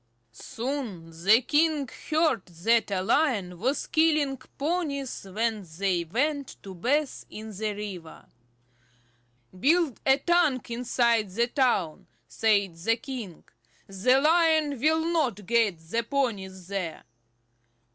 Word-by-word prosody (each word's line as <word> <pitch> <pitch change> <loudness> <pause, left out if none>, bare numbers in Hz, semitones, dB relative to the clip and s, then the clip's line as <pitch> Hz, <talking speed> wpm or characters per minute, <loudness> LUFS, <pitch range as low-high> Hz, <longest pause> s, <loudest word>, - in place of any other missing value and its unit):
Soon 225 - -5
the 220 +5 +6
king 300 0 +2 0.2
heard 310 - +1
that 200 +7 +1
a 190 -2 -1
Lion 200 - +1
was 260 +8 0
killing 310 -4 +2
the 260 - -20
ponies 280 - -2
when 220 0 -1
they 185 -3 0
went 280 - -1
to 195 - -8
bathe 275 - -1
in 215 -1 -8
the 215 +2 -2
river. 200 -6 -8 1.3
"Build 315 - +2
a 270 0 +4
tank 300 -6 +1
inside 235 -3 +1
the 230 +6 +1
town," 240 - 0 0.2
said 200 - +1
the 225 +7 +1
king. 235 - -7 0.4
"The 200 +7 +2
lion 315 -2 +3
will 320 +4 +2
not 275 - 0
get 225 -4 +2
the 165 +9 -2
ponies 205 -8 -2
there." 185 -4 -4
235 Hz, 120 wpm, -27 LUFS, 195-285 Hz, 1.3 s, the